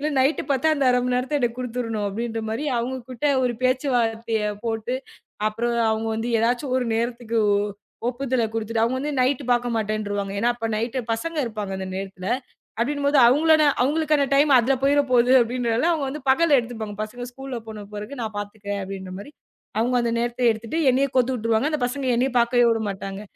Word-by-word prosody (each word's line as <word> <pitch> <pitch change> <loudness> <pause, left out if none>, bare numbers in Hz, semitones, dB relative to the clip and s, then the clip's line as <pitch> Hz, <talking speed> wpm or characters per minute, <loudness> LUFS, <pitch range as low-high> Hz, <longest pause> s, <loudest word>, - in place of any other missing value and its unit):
இல்ல 305 +2 -1
நைட் 275 +4 +2
பாத்தா 270 +4 +2
அந்த 275 - +1
1/2 250 - +3
மணி 250 0 0
நேரத்தை 265 +4 -1
எனக்குக் 240 0 -1
குடுத்துடுணும்" 230 -3 -3
அப்படின்ற 225 +1 -3
மாதிரி 230 +7 -2
அவங்ககிட்ட 255 +2 -3 0.2
ஒரு 240 -1 0
பேச்சுவார்த்தைய 230 -4 +1 0.2
போட்டு 225 +3 -2 0.5
அப்புறம் 235 +2 -2 0.2
அவங்க 220 +1 -1
வந்து 230 +2 -2
எதாச்சும் 250 +3 0
ஒரு 245 - -2
நேரத்துக்கு 235 -1 -2 0.7
ஒப்புதல் 255 -1 -1
குடுத்துட்டு, 225 0 -1
அவங்க 260 +5 -1
நைட் 265 +2 +1
பாக்க 245 0 +1
மாட்டேருவாங்க. 205 -2 -2
ஏன்னா 240 - +2 0.3
நைட் 230 +4 -2 0.2
பசங்க 325 +9 -3
இருப்பாங்க. 210 -4 -5
அந்த 190 - -4
நேரத்துல 190 -1 -6 0.5
அப்படின்னும் 285 +3 0
போது 285 0 +3
அவங்களோட 310 +4 +5 0.2
அவங்களுக்கான 300 0 +2
டைம் 290 +1 +4
அதுல 265 +3 +2
போயிரப்போகுது 260 -3 +3
அப்படின்றதுனால 240 +4 0
அவங்க 305 -4 0
வந்து 295 +1 -6
பகல்ல 295 0 +4
எடுத்துப்பாங்க. 225 -3 -6
பசங்க 245 +3 -7
ஸ்கூல் 270 0 -7
போன 210 -2 -8
பிறகு 210 +6 -7
நான் 215 -2 -4
பாத்துக்கறேன் 205 -1 -5
அப்படின்னு 190 -1 -7
மாதிரி 285 +9 -10 0.5
அவங்க 245 +2 +1
அந்த 235 -1 0
நேரத்தை 240 +1 -2
எடுத்துட்டு 225 +7 -4
என்னைய 270 +2 +3
கோர்த்து 255 +1 +3
விட்டுருவாங்க. 230 +4 +1
அந்தப் 300 -5 -1
பசங்க 260 +1 -3
என்னைய 255 +2 +1
பாக்கவே 240 +1 +4
விடமாட்டாங்க. 200 -3 -3
240 Hz, 165 wpm, -23 LUFS, 225-265 Hz, 0.7 s, அவங்களோட